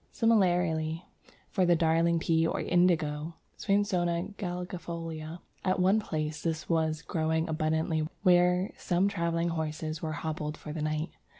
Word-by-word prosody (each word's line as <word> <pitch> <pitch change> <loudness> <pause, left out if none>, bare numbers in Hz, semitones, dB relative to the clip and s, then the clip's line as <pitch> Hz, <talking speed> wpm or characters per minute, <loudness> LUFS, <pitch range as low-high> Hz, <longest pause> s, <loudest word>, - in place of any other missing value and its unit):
Similarly 175 -7 +2 0.4
for 185 - 0
the 175 -1 +5
Darling 165 +1 +3
Pea 165 0 +2
or - - -1
Indigo 165 -3 +1 0.2
(Swainsonia 190 -2 0
galegifolia). 170 -3 -5 0.2
At 185 0 +1
one 190 +4 +4
place 155 -6 -3
this 160 -2 -2
was 160 -2 0
growing 160 0 0
abundantly 160 0 0 0.2
where 180 0 +4
some 180 +2 +1
travelling 170 -3 0
horses 155 -1 -3
were 155 -1 -3
hobbled 150 0 -4
for 150 - -8
the 155 - -4
night. 155 +2 -2
165 Hz, 130 wpm, -29 LUFS, 155-180 Hz, 0.4 s, the